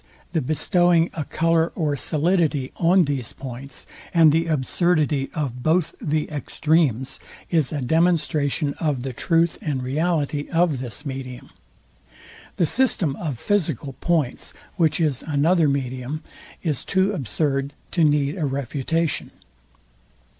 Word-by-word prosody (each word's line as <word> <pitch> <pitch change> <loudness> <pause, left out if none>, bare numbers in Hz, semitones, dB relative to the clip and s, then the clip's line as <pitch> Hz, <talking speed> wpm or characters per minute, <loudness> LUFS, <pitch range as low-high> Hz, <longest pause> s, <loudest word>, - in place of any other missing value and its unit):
the 160 - +1
bestowing 170 +4 +2
a 160 - -3
colour 165 +2 +1
or 150 -5 0
solidity 155 -2 +1
on 175 +1 +4
these 135 -5 -3
points; 135 +1 -8 0.3
and 165 -2 +7
the 165 +2 +1
absurdity 150 -1 +1
of 135 -6 -3
both 160 +4 +1
the 155 0 0
extremes 145 -3 0 0.3
is 160 -6 +2
a 145 -3 -2
demonstration 155 -1 +1
of 145 -6 -1
the 130 -1 -4
truth 165 +5 +1
and 135 -4 -2
reality 145 +1 -1
of 165 -5 +2
this 125 +3 -6
medium. 130 -2 -6 1.0
The 175 - +2
system 185 - +1
of 150 -8 -3
physical 160 - -1
points, 160 -7 0 0.2
which 160 -4 +2
is 150 -6 +1
another 155 +2 +3
medium, 130 +2 -3 0.4
is 155 -7 -1
too 190 +1 +1
absurd 140 - -1 0.2
to 170 - +2
need 150 +2 +2
a 155 - 0
refutation. 140 +4 -1
150 Hz, 125 wpm, -23 LUFS, 135-165 Hz, 1.0 s, and